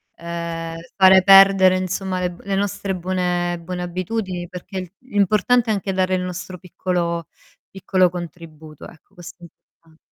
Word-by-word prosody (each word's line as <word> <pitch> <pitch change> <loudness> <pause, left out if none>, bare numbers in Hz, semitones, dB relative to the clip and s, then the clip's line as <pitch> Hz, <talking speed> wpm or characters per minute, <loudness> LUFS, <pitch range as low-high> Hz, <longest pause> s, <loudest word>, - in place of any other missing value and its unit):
ehm, 170 -1 -6 0.2
fare 190 -1 +7
perdere 195 -1 +7
insomma 185 0 -3
le 180 -1 -1
b 175 - -14
le 195 -1 -2
nostre 195 -1 -2
buone 175 -1 -2
buone 180 +1 -5
abitudini, 185 0 -4
perché 185 0 -8
l'importante 225 +1 +1
è 220 - +3
anche 195 -1 -3
dare 185 0 +1
il 180 - -2
nostro 180 0 -6
piccolo 170 -2 -3 0.4
piccolo 185 -2 +1
contributo, 160 -3 -10
ecco, 170 +3 -19
questo 175 0 -12
è - - -18
importante. 160 0 -30
180 Hz, 150 wpm, -21 LUFS, 175-190 Hz, 0.4 s, fare